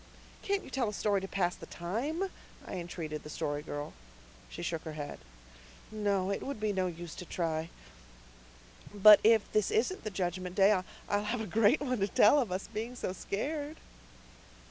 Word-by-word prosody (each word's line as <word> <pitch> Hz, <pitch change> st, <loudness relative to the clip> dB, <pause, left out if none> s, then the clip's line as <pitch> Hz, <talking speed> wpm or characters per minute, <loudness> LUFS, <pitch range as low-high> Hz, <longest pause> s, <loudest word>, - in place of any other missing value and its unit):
"Can't 400 Hz, 0 st, 0 dB
you -, -, -11 dB
tell 255 Hz, -5 st, 0 dB
us 210 Hz, -, -5 dB
a -, -, -7 dB
story 205 Hz, -2 st, +2 dB
to 195 Hz, -, -5 dB
pass 180 Hz, -2 st, 0 dB
the -, -, -11 dB
time?" 285 Hz, -, -3 dB, 0.3 s
I -, -, -7 dB
entreated 165 Hz, -3 st, -5 dB
the 150 Hz, -, -10 dB
Story 145 Hz, -1 st, -2 dB
Girl. 145 Hz, -1 st, -5 dB, 0.6 s
She -, -, -7 dB
shook 165 Hz, -2 st, -2 dB
her 160 Hz, -, -7 dB
head. 145 Hz, -1 st, -6 dB, 0.7 s
"No, 200 Hz, -3 st, 0 dB
it 200 Hz, -, -2 dB
would 275 Hz, -4 st, -4 dB
be 215 Hz, -1 st, 0 dB
no 185 Hz, -1 st, +1 dB
use 170 Hz, -1 st, -7 dB
to -, -, -7 dB
try. 165 Hz, -2 st, -2 dB, 1.3 s
But 210 Hz, +1 st, +10 dB
if 225 Hz, -1 st, +4 dB
this 215 Hz, -2 st, +2 dB
isn't 250 Hz, -, 0 dB
the 215 Hz, -, -2 dB
Judgment 180 Hz, -1 st, -3 dB
Day 200 Hz, 0 st, +6 dB, 0.4 s
I'll 205 Hz, 0 st, +1 dB
have 230 Hz, +2 st, -1 dB
a -, -, -3 dB
great 220 Hz, -, +3 dB
one 255 Hz, -4 st, -1 dB
to 195 Hz, -, +2 dB
tell 210 Hz, +7 st, +6 dB
of 235 Hz, -9 st, -1 dB
us 185 Hz, +2 st, -3 dB
being 225 Hz, +3 st, -5 dB
so 185 Hz, -, -3 dB
scared." 290 Hz, -, -3 dB
200 Hz, 190 wpm, -32 LUFS, 175-225 Hz, 1.3 s, But